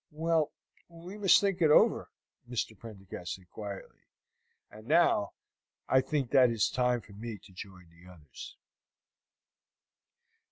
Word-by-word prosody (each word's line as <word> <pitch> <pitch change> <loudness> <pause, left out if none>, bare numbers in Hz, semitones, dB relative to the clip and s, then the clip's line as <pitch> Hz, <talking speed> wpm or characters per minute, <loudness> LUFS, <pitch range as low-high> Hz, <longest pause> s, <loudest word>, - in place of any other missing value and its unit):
"Well, 160 0 0 0.4
we 170 +3 -11
must 195 -3 +6
think 195 -2 -1
it 160 - +5
over," 150 - +4 0.4
Mr. 115 -2 -3
Prendergast 95 -5 -8
said 95 -1 -18
quietly. 100 -2 -8 0.7
"And 110 +1 -13
now 155 -10 +3 0.5
I 130 - +4
think 135 -2 -2
that 130 -3 +6
it - - -1
is 110 -3 +1
time 125 -1 +1
for 100 - -16
me 110 +1 -7
to 95 - -18
join 90 -1 -11
the 85 +2 -17
others." 75 -7 -12
115 Hz, 135 wpm, -30 LUFS, 100-150 Hz, 0.7 s, must